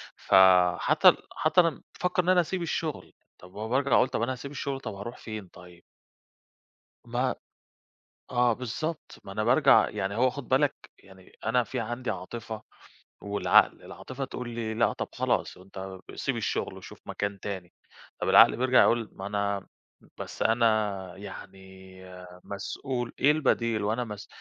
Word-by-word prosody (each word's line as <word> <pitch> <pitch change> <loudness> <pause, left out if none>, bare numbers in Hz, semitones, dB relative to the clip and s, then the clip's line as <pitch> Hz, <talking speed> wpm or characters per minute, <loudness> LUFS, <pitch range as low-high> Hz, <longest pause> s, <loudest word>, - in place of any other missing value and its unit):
فَحتى 90 -2 +5 0.2
حتى 160 +3 +4
أنا 165 -2 -1 0.2
بافكر 180 0 +1
إن 180 - -1
أنا 185 -1 +6
أسيب 180 +2 -3
الشغل، 160 -2 -3 0.3
طَب 90 +1 -15
ما 105 - -8
هو 110 - -4
بارجع 135 +3 +1
أقول - - +5
طَب 125 - -2
أنا 125 +3 0
هاسيب 140 +2 -8
الشغل، 140 -1 -4
طَب 110 - -6
هاروح 115 +5 -7
فين 110 -3 -7
طيب؟ 90 0 -16 1.2
ما - - -1 1.0
آه 120 -1 +3
بالضبط، 130 +7 -5
ما 95 - -8
أنا 105 +2 -2
بارجع - - +5
يعني 95 +1 -3
هو 130 +2 +3
خُد 135 0 -8
بالك 140 +2 +3 0.2
يعني 95 -1 -18
أنا 120 +2 +2
في 125 +2 -4
عندي 120 +3 -3
عاطفة 110 +3 -6 0.6
والعقل، 100 0 +3
العاطفة 135 +1 -7
تقول 125 -2 -6
لي: 115 -2 -4
"لأ 115 +1 +2
طَب - - -4
خلاص، - - -1
أنت 95 0 -9 0.2
سيب - - -2
الشغل - - -2
وشوف - - -12
مكان 100 -1 -3
تاني،" 95 -3 -6 0.5
طب - - 0
العقل - - +7
بيرجع 130 +1 +4
يقول 115 -2 +2
ما 95 - -7
أنا 100 -1 -2 0.5
بس - - -7
أنا 105 -5 +1
يعني 95 -1 -10 0.5
آآ 90 -1 -12
مسؤول 120 +5 -4
إيه 145 - +5
البديل؟ 115 -7 +1
وأنا 110 +4 0
مس 105 -2 -8
115 Hz, 155 wpm, -28 LUFS, 100-130 Hz, 1.2 s, العقل